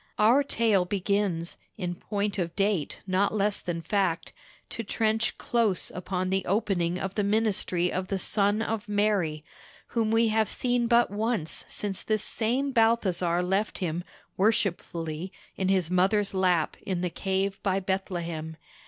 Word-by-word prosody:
Our 230 +6 +5
tale 225 -8 +2
begins, 190 -2 -1 0.2
in 180 -4 -2
point 200 +2 -2
of 170 -1 -2
date 200 -6 0
not 195 +2 +1
less 205 0 +1
than 170 -2 -4
fact, 180 -1 0 0.4
to 230 - -4
trench 220 +1 0
close 225 -6 0
upon 185 0 -3
the 190 -1 +1
opening 185 -4 0
of 190 +1 -3
the 205 - 0
ministry 200 -4 +1
of 185 0 -2
the 195 - -1
Son 205 +3 +1
of 220 -1 -3
Mary, 200 -7 +1 0.4
whom 225 -2 0
we 225 0 +3
have 220 0 +2
seen 245 -1 +1
but 235 -2 +4
once 210 -5 -1
since 200 -2 -4
this 215 -1 0
same 250 +5 +1
Balthasar 190 -7 +2
left 195 +4 0
him 175 -1 -2 0.3
worshipfully 175 -5 0 0.2
in 190 - -1
his 185 -3 +1
mother's 195 +3 +2
lap 180 -4 +1
in 185 -3 -2
the 180 -1 -1
cave 195 +1 -1
by 195 -1 +1
Bethlehem. 170 -4 -3
195 Hz, 150 wpm, -27 LUFS, 180-215 Hz, 0.4 s, Our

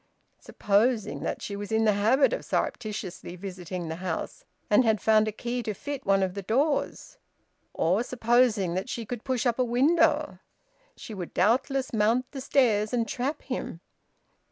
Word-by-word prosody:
Supposing 215 +2 0
that - - -4
she 200 - -4
was 205 +1 -6
in 220 0 +2
the 210 - +4
habit 230 - +3
of - - -3
surreptitiously 200 -6 -3
visiting 180 -2 -6
the 160 0 -5
house, 180 -2 -5 0.2
and 210 +5 +5
had 220 -2 +2
found 215 +2 +3
a - - -1
key 240 +3 -4
to 215 -3 -4
fit 285 -1 -6
one 195 -1 +4
of 185 -1 -1
the 200 - -5
doors, 275 - -1 0.6
or 180 +6 +2
supposing 235 -6 +2
that 185 +2 -3
she 230 - -4
could 235 +1 -6
push 260 -3 -1
up 240 0 +1
a - - +4
window, 295 - +2 0.6
she 220 - -9
would 180 -4 -7
doubtless 255 +7 +1
mount 230 +4 +1
the 270 - -6
stairs 225 -6 +2
and 230 -2 +1
trap 265 +7 -3
him! 250 -10 -5
220 Hz, 170 wpm, -27 LUFS, 200-255 Hz, 0.6 s, and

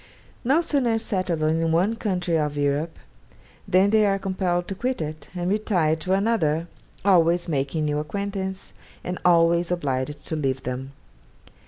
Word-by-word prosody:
No 275 +7 +3
sooner 265 -8 +1
settled 185 -7 -1
in 160 +1 +1
one 185 +7 +2
country 180 -6 -1
of 150 -2 0
Europe, 145 +3 0 0.7
than 195 +1 +4
they 215 -1 +5
are 195 0 +2
compelled 185 -2 -1
to - - -2
quit 250 +6 -2
it, 155 -2 -5
and 175 0 -2
retire 185 -6 +1
to 180 +4 -1
another, 190 -7 +1 0.4
always 175 -2 +4
making 150 0 -1
new 150 0 0
acquaintance, 190 +3 -4 0.3
and 180 0 -4
always 170 0 +4
obliged 145 -4 -2
to 160 - -3
leave 135 -3 -1
them. 130 +2 -5
175 Hz, 150 wpm, -24 LUFS, 155-195 Hz, 0.7 s, they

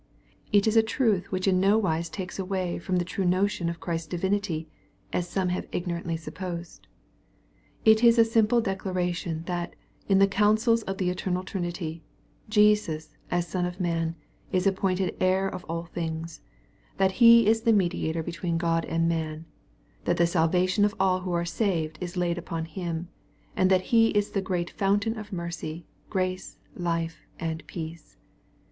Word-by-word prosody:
It 205 -2 +4
is 220 0 +2
a 225 - +8
truth 220 -4 0
which 185 0 -1
in 185 -1 +4
nowise 185 -5 +2
takes 190 +1 -6
away 185 -2 -2
from 185 +2 -2
the 175 -1 +1
true 185 +2 -3
no 185 +2 +3
tion 175 -4 -2
of 170 0 -5
Christ's 165 -2 -3
divinity, 175 -2 -1 0.5
as 175 -1 -1
some 185 -1 0
have 180 - -2
ignorantly 170 -2 -2
supposed. 170 +1 -7 1.0
It 220 +1 +6
is 235 -1 +7 0.2
simply 225 +1 +4
a - - +4
declaration, 180 -4 -2
that, 175 -1 -3 0.3
in 195 - +4
the 195 - +7
counsels 215 +4 +3
of 195 -3 -4
the 180 -3 0
eternal 180 0 -2
Trinity, 175 -3 -4 0.5
Jesus, 210 -7 +2
as 175 0 0
Son 180 +2 -2
of 180 +1 -3
man, 165 -2 -1 0.4
is 185 0 +1
appointed 190 -1 +1
heir 185 +1 +3
of 185 - -6
all 165 +1 -4
things, 165 -1 -5 0.3
— - - -34
that 190 0 +3
He 230 -1 +9
is 225 +2 +3
the 230 - +3
Mediator 170 -5 +1
between 170 0 -2
God 165 -1 +1
and 165 0 0
man, 160 -1 -2 0.3
— - - -34
that - - +1
the 170 - +4
salvation 180 +4 +2
of 210 +1 +2
all 185 -1 +3
who 180 -1 -4
are 170 0 0
saved 165 -4 -1
is 180 0 -5
laid 175 -1 0
upon 165 -1 -4
Him, 170 0 -4 0.2
— - - -34
and 185 0 +3
that 185 -1 +4
He 225 -1 +7
is 205 -1 0
the 195 - 0
great 180 -2 -2
fountain 205 +3 +1
of 215 -1 -8
mercy, 170 -2 -5 0.2
grace, 185 -1 -2 0.2
life, 165 -2 -3
and 160 -1 -3
peace. 160 - -8
180 Hz, 175 wpm, -27 LUFS, 170-195 Hz, 1.0 s, He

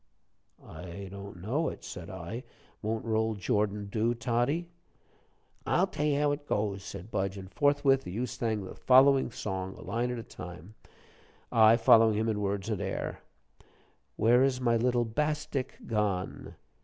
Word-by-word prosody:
"I 90 +2 -8
don't 100 -2 -9
know 130 - 0
it," - - -9
said 90 -3 -8
I. 95 +7 -6 0.4
"Won't 110 +1 -2
'Roll, 110 0 +1
Jordan,' 105 +1 0
do, 110 +4 0
Toddie?" 120 +8 0 1.0
"I'll - - +2
tell 150 - -2
you 145 -1 +2
how 145 0 +3
it 145 0 -4
goes," 100 -2 -1
said 100 +1 -8
Budge, 95 +1 -1
and 95 0 -9
forthwith 145 +2 +3
the - - -7
youth 120 +6 -3
sang 110 -3 -2
the 95 - -8
following 135 +1 +5
song, 95 -4 -4
a - - -12
line 115 +5 -1
at 125 - -3
a 115 - -5
time, 90 0 -10 0.8
I 110 0 +6
following 115 -1 +6
him 110 +1 +1
in 105 -2 -1
words 100 0 -2
and 110 -4 -2
air: - - -3 1.0
"Where 120 +4 +4
is 135 -2 +1
my 120 -2 +2
little 120 +1 +2
bastik 150 +2 -2
gone?" 105 -4 -2
110 Hz, 160 wpm, -30 LUFS, 100-125 Hz, 1.0 s, I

